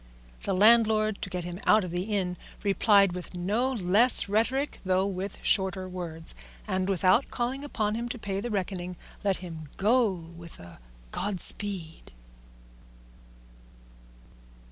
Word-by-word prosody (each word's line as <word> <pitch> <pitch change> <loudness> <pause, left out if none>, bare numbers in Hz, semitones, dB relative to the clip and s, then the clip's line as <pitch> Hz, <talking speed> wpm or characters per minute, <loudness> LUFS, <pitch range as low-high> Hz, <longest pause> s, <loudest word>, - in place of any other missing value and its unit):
The - - -1
landlord, 215 0 +4
to - - -4
get 180 -1 -4
him 175 +1 -6
out 215 -1 +6
of 180 - -5
the 175 +2 -2
inn, 195 -4 -1 0.3
replied 200 -1 +4
with 180 0 -7
no 210 +9 0
less 220 +2 +3
rhetoric 230 +8 0
though 185 0 +2
with 195 0 -4
shorter 190 -1 +1
words, 170 -3 -6 0.3
and 190 -1 -1
without 190 +6 +3
calling 255 +3 -2
upon 215 -7 -1
him 235 +2 -3
to 245 - -4
pay 195 -3 -3
the 240 - -4
reckoning 180 -3 -3 0.3
let 195 -2 +2
him 160 -3 -8
go 225 +2 +3
with 170 -1 -11
a 85 -5 -12 0.3
Godspeed. 190 - -2
195 Hz, 135 wpm, -28 LUFS, 180-215 Hz, 0.3 s, out